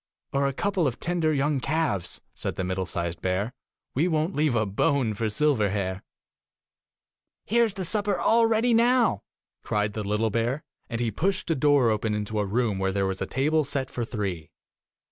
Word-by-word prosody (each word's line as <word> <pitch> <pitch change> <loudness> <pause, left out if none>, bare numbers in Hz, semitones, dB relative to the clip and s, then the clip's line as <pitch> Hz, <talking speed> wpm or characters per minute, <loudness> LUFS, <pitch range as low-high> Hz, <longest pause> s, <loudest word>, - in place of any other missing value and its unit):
'Or 140 0 +2
a 135 - -1
couple 190 +1 0
of 125 - -3
tender 170 -2 0
young 145 -1 +1
calves,' 145 - -1
said - - -4
the 95 - -2
middle 95 0 -2
sized 85 -1 -3
bear. 95 +6 -1 0.4
'We 155 +7 +2
won't 160 +2 0
leave 150 -4 +2
a 110 -1 +2
bone 110 +4 +1
for 110 +2 -3
Silverhair.' 105 -8 +1 0.8
' - - -65
Here 235 +2 +3
is 210 -4 -4
the 190 - -3
supper 205 +2 0
all 230 0 +4
ready 225 +2 +2
now,' 235 - +3 0.4
cried 105 -1 0
the 110 - -3
little 105 +2 0
bear, 120 +7 -1 0.3
and 115 - -3
he 120 -2 0
pushed 185 - -1
a - - +2
door 140 -4 +4
open 105 0 0
into 105 +1 -2
a 105 - +1
room 110 -1 0
where 95 0 +1
there 100 0 0
was 95 0 -3
a - - -1
table 155 +4 +1
set 140 -1 -2
for 120 - -3
three. 95 - -4
125 Hz, 190 wpm, -26 LUFS, 105-160 Hz, 0.8 s, all